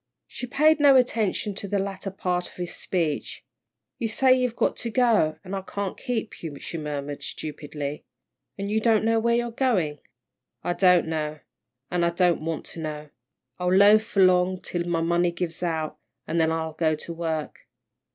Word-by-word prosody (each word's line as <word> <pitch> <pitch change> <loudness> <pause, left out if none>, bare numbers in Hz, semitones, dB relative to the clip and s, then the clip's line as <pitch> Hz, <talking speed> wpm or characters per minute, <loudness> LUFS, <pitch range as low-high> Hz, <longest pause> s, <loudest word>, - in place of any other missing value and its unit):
She 250 - -7
paid 305 +5 +4
no 285 -2 +7
attention 225 -5 +1
to 200 +1 -5
the 200 - 0
latter 195 0 -3
part 180 -2 -2
of - - -14
his 175 -1 -5
speech. 165 -5 -2 0.5
"You 230 - 0
say 255 +4 +4
you've 250 -2 0
got - - +1
to 235 - -3
go, 225 -10 +3
an' 190 0 -8
I 195 - -2
can't 195 0 -4
keep 235 -4 -4
you," 155 -4 -6
she 165 - -6
murmured, 145 -1 -4
stupidly, 150 -1 -6 0.5
"an' 200 0 -3
you 215 +1 +2
don't 220 -1 +3
know 225 0 +3
where 235 +1 +2
you're 240 0 -1
goin'." 190 - 0 0.6
"I 175 - 0
don't 180 -2 +4
know, 155 -1 -3 0.5
an' 175 -1 +1
I 170 - +3
don't 170 -2 +2
want 165 -1 -3
to - - -8
know. 150 -1 -5 0.5
I'll 180 +1 +2
loaf 215 +3 +5
along 185 -1 +4
till 175 -1 -3
my 170 -1 0
money 175 +1 +2
gives 170 -1 -4
out, 160 -3 -2 0.3
then 160 -1 +1
I'll 160 -1 -2
go 160 0 +1
to 170 +2 -7
work." 160 -2 -4
180 Hz, 180 wpm, -25 LUFS, 160-215 Hz, 0.6 s, no